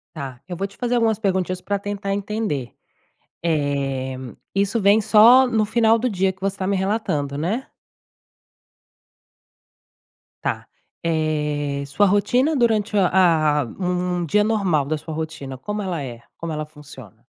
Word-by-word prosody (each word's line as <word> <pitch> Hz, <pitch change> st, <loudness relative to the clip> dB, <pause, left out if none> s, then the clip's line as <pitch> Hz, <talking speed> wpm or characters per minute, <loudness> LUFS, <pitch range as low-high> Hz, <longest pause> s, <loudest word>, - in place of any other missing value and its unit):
Tá, 135 Hz, -4 st, -7 dB
eu 175 Hz, -, -5 dB
vou 195 Hz, +1 st, -2 dB
te 200 Hz, -, -20 dB
fazer 245 Hz, 0 st, 0 dB
algumas 225 Hz, -3 st, +2 dB
perguntinhas 185 Hz, -3 st, -1 dB
pra 200 Hz, 0 st, -1 dB
tentar 200 Hz, -1 st, -3 dB
entender. 200 Hz, -, -3 dB, 0.7 s
Eh, 140 Hz, -4 st, -1 dB, 0.4 s
isso 200 Hz, +3 st, +1 dB
vem 200 Hz, +2 st, +5 dB
só 235 Hz, +5 st, +7 dB
no 220 Hz, -3 st, +1 dB
final 225 Hz, +1 st, +3 dB
do 250 Hz, +2 st, 0 dB
dia 190 Hz, -1 st, +1 dB
que 190 Hz, -, -27 dB
você 195 Hz, 0 st, -2 dB
tá 185 Hz, -, -3 dB
me 200 Hz, 0 st, +1 dB
relatando, 185 Hz, -8 st, -1 dB
né? 205 Hz, -, -2 dB, 2.8 s
Tá. -, -, -2 dB, 0.4 s
Eh, 150 Hz, -3 st, -1 dB
sua 205 Hz, +9 st, +2 dB
rotina 245 Hz, +10 st, +2 dB
durante 220 Hz, -4 st, +1 dB
a 165 Hz, -6 st, +3 dB
um 180 Hz, -1 st, -1 dB
dia 210 Hz, +6 st, +3 dB
normal 190 Hz, -10 st, +1 dB
da 155 Hz, +2 st, -1 dB
sua 160 Hz, +1 st, -8 dB
rotina, 150 Hz, -4 st, -5 dB
como 210 Hz, +10 st, -4 dB
ela 175 Hz, -6 st, -3 dB
é? 120 Hz, -3 st, -7 dB, 0.2 s
Como 170 Hz, -1 st, -5 dB
ela 155 Hz, 0 st, -3 dB
funciona? 145 Hz, -8 st, -14 dB
185 Hz, 145 wpm, -22 LUFS, 150-210 Hz, 2.8 s, só